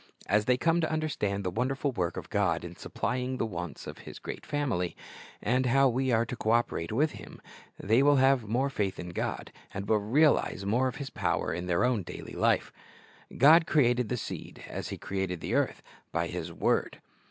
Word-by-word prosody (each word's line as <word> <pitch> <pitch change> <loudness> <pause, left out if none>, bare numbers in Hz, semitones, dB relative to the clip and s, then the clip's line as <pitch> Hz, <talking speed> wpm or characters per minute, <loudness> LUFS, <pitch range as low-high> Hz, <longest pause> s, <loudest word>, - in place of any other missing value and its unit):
As 105 +2 +2
they 125 +1 +3
come 165 +4 +2
to 160 - 0
understand 125 -11 -1
the 90 - -1
wonderful 130 +7 -1
work 90 -7 -2
of - - -7
God 95 -6 +1
in 85 0 -8
supplying 125 +8 -3
the 115 - 0
wants 90 -6 -6
of - - -8
His - - -10
great - - -7
family, 130 - -1 0.5
and 125 +1 +2
how 135 +2 +5
we 130 +2 0
are 115 0 +3
to 125 - -5
co 110 - -3
operate 115 -8 +1
with 150 +7 +2
Him, - - -11 0.4
they 110 +6 +3
will 145 +1 +5
have 135 -4 +3
more 130 +6 0
faith 100 -6 -1
in 90 - -5
God, 85 - -3 0.2
and 100 0 -5
will 110 - +3
realize 120 -2 +2
more 120 +6 +2
of 130 - -4
His 135 -1 -6
power - - -1
in 90 +2 -4
their 85 -1 +2
own 125 -4 +1
daily - - -8
life. - - +1 0.6
God 160 +5 +7
created 125 -5 +3
the 125 - -1
seed, - - -7
as - - -5
He - - -5
created 95 -3 -3
the - - -4
earth, - - 0 0.3
by 85 +1 0
His 85 -1 -5
word. - - 0
120 Hz, 200 wpm, -29 LUFS, 95-135 Hz, 0.6 s, God